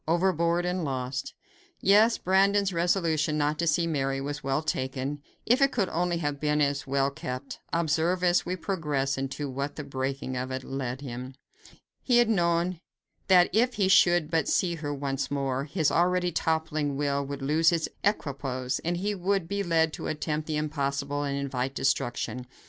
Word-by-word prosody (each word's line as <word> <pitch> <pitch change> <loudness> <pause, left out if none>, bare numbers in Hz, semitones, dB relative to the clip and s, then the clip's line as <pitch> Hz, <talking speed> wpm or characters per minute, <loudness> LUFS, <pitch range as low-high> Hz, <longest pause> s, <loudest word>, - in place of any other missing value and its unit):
Overboard 170 0 +2
and 180 0 -1
lost! 130 -2 -3 0.4
Yes, 215 +4 +5
Brandon's 195 +1 +2
resolution 165 -3 +1
not 150 0 0
to 170 - 0
see 165 +2 +2
Mary 135 -4 -1
was 145 +2 -5
well 135 +3 0
taken, 135 0 -3 0.2
if 245 +4 +3
it 275 0 +5
could 200 -6 0
only 175 +1 0
have 145 -3 -2
been 150 0 +1
as 140 -1 0
well 135 0 +1
kept. 135 -2 -6
Observe, 170 +2 +1
as 175 0 +3
we 180 - -2
progress, 150 -8 -1
into 135 +2 -3
what 140 +2 -4
the 150 - -5
breaking 135 -1 -3
of 125 +1 -3
it 130 0 -4
led 130 -1 -4
him. 130 -1 -7 0.7
He 245 -2 +3
had 240 -2 +4
known 170 -3 +1 0.5
that 180 -2 +5
if 245 +4 +2
he 195 -3 +2
should 175 -4 +4
but 160 -3 +1
see 175 -2 +1
her 150 -3 -4
once 140 -1 -2
more, 135 -1 -1
his 155 0 0
already 180 +1 +2
toppling 155 -3 -1
will 140 -1 0
would 140 0 -6
lose 160 +4 +3
its 165 -2 0 0.2
equipoise, 135 -9 -1
and 175 +1 -2
he 205 +3 -1
would 195 -2 0
be 200 +3 -2
led 165 -4 +2
to - - -5
attempt 155 0 -2
the 155 -1 -1
impossible 145 -1 -2
and 140 -1 -2
invite 135 -1 -2
destruction. 125 -2 -1
150 Hz, 175 wpm, -27 LUFS, 140-175 Hz, 0.7 s, Yes